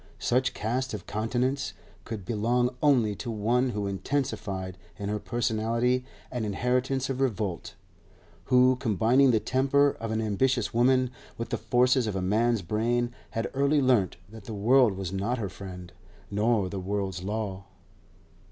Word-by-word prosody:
Such 130 +2 +1
cast 125 +2 -2
of - - -8
countenance 125 +5 -1 0.3
could 110 -4 -6
belong 120 +4 +1
only 125 -8 +4
to 120 - -5
one 115 +4 +1
who 105 -4 -2
intensified 100 -4 -2 0.2
in 100 0 -4
her 105 0 -1
personality 120 +2 0 0.3
an 125 -3 -2
inheritance 125 +5 0
of 135 0 -3
revolt; 105 -7 -2 0.7
who, 125 0 +5
combining 125 +3 +3
the 115 -3 +4
temper 140 +4 +3
of 115 - -4
an 110 0 -1
ambitious 110 +3 0
woman 130 +1 +3 0.3
with 115 - -4
the - - -1
forces 125 -1 +3
of 105 - -2
a - - 0
man's 110 +2 +2
brain, 120 +6 0 0.2
had 115 - -1
early 140 +2 +3
learnt 125 -10 +2
that 110 0 -12
the 110 - -6
world 120 +2 +4
was 95 -1 -5
not 100 +6 -1
her 105 -5 -3
friend 90 -2 -9 0.4
nor 105 -1 +2
the 95 +1 -4
world's 95 -1 -3
law. 100 -1 -4
115 Hz, 150 wpm, -27 LUFS, 105-125 Hz, 0.7 s, who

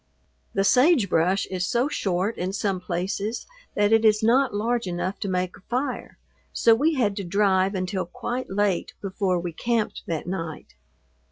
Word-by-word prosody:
The 195 - +2
sagebrush 200 - +3
is 180 -1 -1
so 245 +3 +2
short 195 -4 -1
in 185 +2 -3
some 200 -2 -1
places 190 +5 -3 0.3
that 205 +1 +3
it 225 0 +4
is 215 -1 +4
not 255 +4 +4
large 225 +1 -1
enough 180 +2 -3
to - - -3
make 185 -1 -1
a - - -16
fire, 255 +4 -3 0.3
so 230 - +4
we 300 +8 +2
had 210 -7 +1
to 200 - -3
drive 190 +1 +2
until 185 0 -2
quite 245 +8 -4
late 200 -2 0
before 190 -2 -1
we 175 0 -4
camped 230 +4 -1
that 160 -2 -3
night. 165 -3 -5
200 Hz, 165 wpm, -25 LUFS, 185-225 Hz, 0.3 s, it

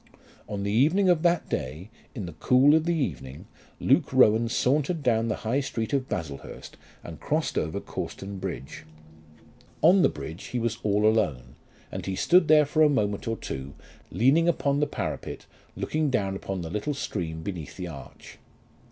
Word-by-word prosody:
On 100 -1 -3
the 100 - -1
evening 160 - +3
of 175 -3 +3
that 175 0 +2
day 80 - -4 0.2
in 105 -7 -4
the 85 - -7
cool 130 - +4
of 160 0 +3
the 170 0 +1
evening 70 - -4 0.3
Luke - - +2
Rowan 110 +2 +4
sauntered 145 +6 +1
down 115 -3 +2
the 110 - 0
High 120 +5 +1
Street 115 -3 -3
of 135 -2 0
Baslehurst, 75 -5 -6 0.3
and - - -9
crossed - - -1
over 80 0 -1
Cawston 100 0 -6
bridge. 65 -3 -6 1.0
On 180 +4 +6
the - - +5
bridge 80 +4 -8
he 125 - -4
was 115 -1 -2
all 105 0 +1
alone, 80 - +1 0.4
and - - -6
he 95 - -2
stood 175 - +4
there 150 -1 +6
for 155 +2 0
a 155 - +7
moment 105 -7 -1
or 115 0 -1
two 70 +2 -6 0.3
leaning 150 +8 +3
upon 140 -4 +1
the 150 - +1
parapet - - -5 0.3
looking 155 -1 -1
down 100 -7 0
upon 95 -1 -4
the 80 -1 -6
little 105 +9 -2
stream 80 -11 -4
beneath 85 -5 -6
the 90 -2 -5
arch. 80 -5 -11
110 Hz, 175 wpm, -26 LUFS, 90-145 Hz, 1.0 s, a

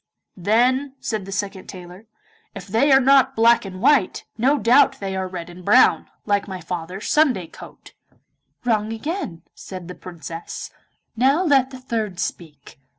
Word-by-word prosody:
'Then,' 250 +8 +1
said 215 -4 -3
the - - -7
second 195 -1 -4
tailor, 180 +3 -11 0.5
'if 185 - -8
they 225 +8 +2
are 265 - +7
not 270 0 +4
black 230 0 +4
and 185 -1 -8
white, 285 -10 +3
no 265 +6 +2
doubt 270 +2 +4
they 195 -1 -4
are 190 0 -2
red 180 -2 -7
and 175 +1 -12
brown, 225 +7 +4 0.2
like 205 -1 0
my 190 -2 -6
father's 180 +3 -6
Sunday 265 - +2
coat.' 165 - -14 0.7
'Wrong 220 -2 0
again,' 225 - -5
said 185 -3 -9
the 180 - -7
Princess; 165 -2 -8 0.4
'now 270 +9 +3
let 275 -6 +3
the 260 -1 -10
third 220 -8 -4
speak. 150 -5 -6
210 Hz, 155 wpm, -21 LUFS, 185-260 Hz, 0.7 s, are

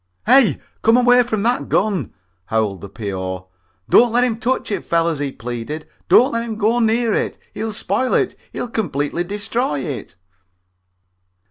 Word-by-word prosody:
"Hey, 265 -5 +5 0.2
come 225 +2 +5
away 245 0 +5
from 220 -4 -1
that 240 +2 0
gun!" 195 - 0 0.3
howled 105 -3 -1
the 100 - -8
P.O. 95 -3 -5 0.4
"Don't 240 -1 +5
let 245 +2 +3
him 230 -3 0
touch 250 -1 -1
it, - - -2
fellers," 165 -2 0
he 145 -1 -2
pleaded. 125 +6 -6 0.2
"Don't 260 +4 +6
let 230 - -1
him 230 -1 -4
even - - -8
go 225 +3 +2
near 230 0 +2
it. - - -1 0.2
He'll 220 0 -3
spoil 255 +4 -1
it. - - +1 0.2
He'll - - -4
completely 175 - -2
destroy 205 - -2
it." - - -6
210 Hz, 160 wpm, -20 LUFS, -, 0.4 s, Don't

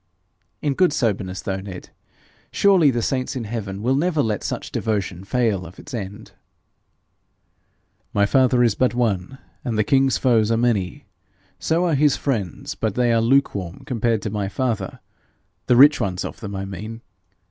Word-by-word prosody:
'In 145 -2 +1
good 180 +4 +3
soberness, 100 -8 -1
though, 95 -1 -2
Ned, 95 -2 -9 0.6
surely 190 -7 +4
the 120 -3 -1
saints 130 +1 -1
in 125 - -3
heaven 105 -3 -5
will 125 +3 +2
never 155 +1 +1
let 105 -3 -2
such - - -4
devotion 100 -4 -2
fail 110 -3 0
of 85 +2 -12
its - - -11
end.' 105 -1 -6 1.8
'My 100 0 +3
father 125 +2 +3
is 115 -4 +3
but 125 +2 +1
one, 115 0 -1 0.3
and 115 -3 -2
the 105 - +3
king's 135 +3 +3
foes 115 -4 +3
are 115 - +2
many. 115 +1 0 0.5
So 165 +2 +1
are 170 - +1
his 145 0 +3
friends 110 - -3
but 110 -3 -2
they 120 -1 +2
are 115 - +3
lukewarm 115 -8 +1
compared 115 -4 0
to 105 - -3
my 100 -2 -2
father 110 -4 -2 0.7
the 125 - +4
rich 145 +5 +7
ones 95 -1 -2
of - - -7
them, 100 -3 -6
I 95 0 -3
mean. 105 +4 -7
115 Hz, 170 wpm, -22 LUFS, 100-130 Hz, 1.8 s, rich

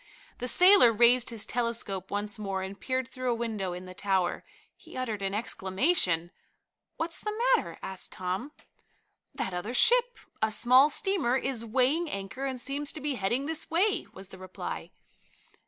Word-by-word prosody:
The 250 - -3
sailor 360 - +7
raised 240 +2 +4
his 230 -3 -1
telescope 230 -6 -3
once 205 +2 -3
more 195 -2 -3
and 195 +1 -7
peered 260 -1 -1
through 255 -1 -4
a 240 - +1
window 220 -5 -3
in 180 +1 -8
the 185 - -10
tower. 190 -2 -1 0.3
He - - -13
uttered 225 -5 -3
an 195 0 -2
exclamation. 190 - +1 0.7
"What's 330 +1 -3
the 425 +1 -4 0.2
matter?" - - -4
asked 190 -1 -4
Tom. 185 +9 -4 0.8
"That 190 - -3
other 205 +8 -4
ship - - +3 0.2
a 220 - +2
small 250 +6 +5
steamer 315 - +1
is 260 -3 -2
weighing 265 +9 +1
anchor 200 +6 -5
and 260 -2 -3
seems 280 +3 -2
to - - -4
be 295 0 -2
heading 240 +4 -1
this 320 +1 -1
way," 390 +5 +1
was 190 0 -11
the 190 - -12
reply. 185 0 -7
235 Hz, 165 wpm, -28 LUFS, 195-275 Hz, 0.8 s, sailor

